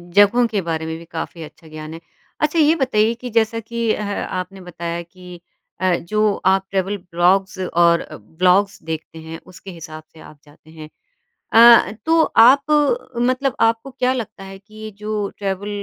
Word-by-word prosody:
जगहों 205 +4 +5
के 210 -3 -2
बारे 165 -2 -3
में 160 0 -5
भी 165 - -13
काफ़ी 165 0 -7
अच्छा 160 +1 -14
ज्ञान 155 0 -9
है। 165 - -9 0.4
अच्छा 300 +2 +1
ये 310 +1 +4
बताइए 225 -6 +1
कि 245 +1 -8
जैसा 230 0 0
कि 230 0 -2
अ, - - -4
आपने 195 -2 -5
बताया 170 -1 -6
कि 180 +1 -13 0.4
अ, 185 -1 +2
जो 210 +5 0
आप 190 0 +3
ट्रैवल 195 +1 -1
ब्लॉग्स 180 +1 0
और 170 -2 +2
ब्लॉग्स 185 - 0
देखते 160 0 -7
हैं 160 0 -9
उसके 185 +1 -12
हिसाब 160 -2 -10
से 160 - -17
आप 155 -1 -15
जाते 150 +1 -21
हैं। 155 -1 -11 0.6
अ - - +4
अ, 235 -1 +8
तो 325 0 +4 0.2
आप 275 +3 +5 0.5
मतलब 255 +2 0
आपको 225 +4 +1
क्या 255 0 0
लगता 230 -6 -6
है 195 0 -11
कि 215 +2 -21
ये 215 0 -8
जो 210 -1 -2
ट्रैवल 200 0 -4
195 Hz, 180 wpm, -19 LUFS, 170-225 Hz, 0.6 s, अ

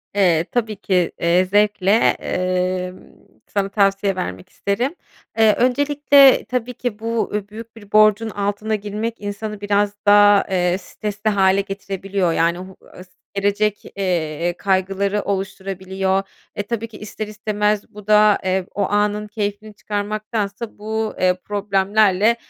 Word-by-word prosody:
Eee, 175 -5 +3
tabii 225 -3 -1
ki, 185 -3 0
eee, 175 +2 +3
zevkle, 205 0 +2 0.3
emm, 185 0 -2 0.5
sana 195 -1 -1
tavsiye 195 -1 +1
vermek 95 - -5
isterim. 240 - -2 0.4
Eee, 220 -1 +6
öncelikle, 280 +2 +4
tabii 250 +1 -3
ki, 240 -3 -4
bu, 230 0 -2 0.2
büyük 225 +1 -10
bir 205 -2 -15
borcun 215 +1 +4
altına 205 +1 -2
girmek 210 +3 -4
insanı 205 0 -5
biraz 205 0 +1
daha, 205 0 +6
eee, 180 -1 +1
stresli 210 +2 -4
hâle 195 -1 +3
getirebiliyor. 195 -2 -2
Yani, 170 +2 +1
o - - -6 0.3
h 180 - -9
s 185 - -24 0.2
gelecek, 205 +1 0
eee, 175 -3 -1
kaygıları 195 +1 0
oluşturabiliyor. 190 0 -2 0.3
E, 205 - -2
tabii 230 +1 -4
ki 220 -2 -13
ister 210 0 -6
istemez 210 -1 -1
bu 210 0 -12
da, 210 -1 +5
eee, 185 0 0
o 205 - +1
anın 210 +1 0
keyfini 210 0 -4
çıkarmaktansa 210 +1 -4
bu, 220 +1 -3
eee, 185 0 +3
problemlerle, 205 +1 +2
205 Hz, 135 wpm, -20 LUFS, 190-215 Hz, 0.5 s, Eee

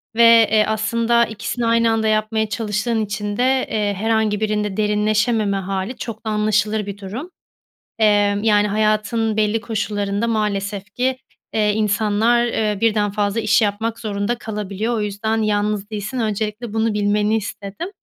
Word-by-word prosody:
Ve, 230 -1 +7
eee, 215 -1 +5
aslında 230 +2 +2
2'sini 230 +2 -4
aynı 230 0 +3
anda 220 -1 +1
yapmaya 215 0 0
çalıştığın 220 +1 -1
için 205 0 -4
de, 260 +1 +2
eee, 210 -2 0
herhangi 220 0 0
birinde 210 -2 -1
derinleşememe 210 0 +1
hâli 195 +5 -3
çok 225 -1 -7
da 220 - -1
anlaşılır 210 0 +1
bir 200 0 -6
durum. 215 - -7 0.7
Eee, 220 - +4 0.4
yani, 210 -1 +3
hayatın 215 +1 0
belli 215 +1 +1
koşullarında 205 0 -2
maalesef 205 -2 -2
ki, 255 +1 0 0.4
eee, 210 -1 +2
insanlar, 220 +3 +2
eee, 215 -3 -1
1'den 210 -2 +2
fazla 205 +1 -1
iş 215 +2 +3
yapmak 220 +2 -1
zorunda 205 +1 -2
kalabiliyor. 210 +1 -3
O 220 - -1
yüzden 215 +2 -1
yalnız 210 -1 0
değilsin, 215 +4 -4
öncelikle 215 +1 -3
bunu 225 -1 +1
bilmeni 210 +1 +1
istedim. 205 - -6
215 Hz, 145 wpm, -20 LUFS, 205-225 Hz, 0.7 s, Ve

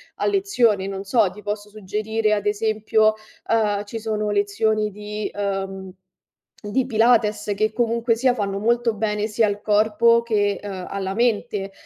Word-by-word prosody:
a - - -2
lezione, 245 - +2
non 195 0 -5
so, 205 0 +2
ti 210 - -12
posso 210 0 -4
suggerire 215 +1 -1
ad 205 -1 -1
esempio, 215 +1 +2 0.4
uhm, 210 -2 +1
ci 225 +2 -6
sono 215 -1 -2
lezioni 210 +1 +1
di 210 +1 -5
uhm, 195 -2 -4 0.7
di 245 +5 0
Pilates, 215 -3 +2
che 215 +2 +1
comunque 230 0 +1
sia 250 +2 +2
fanno 200 -4 -2
molto 235 0 +1
bene 210 0 -1
sia 220 +1 +2
al 205 0 -2
corpo 220 +3 +3
che, 205 -3 0
uhm, 190 -3 -6
alla 190 -1 -3
mente, 210 -3 0
210 Hz, 150 wpm, -22 LUFS, 205-225 Hz, 0.7 s, corpo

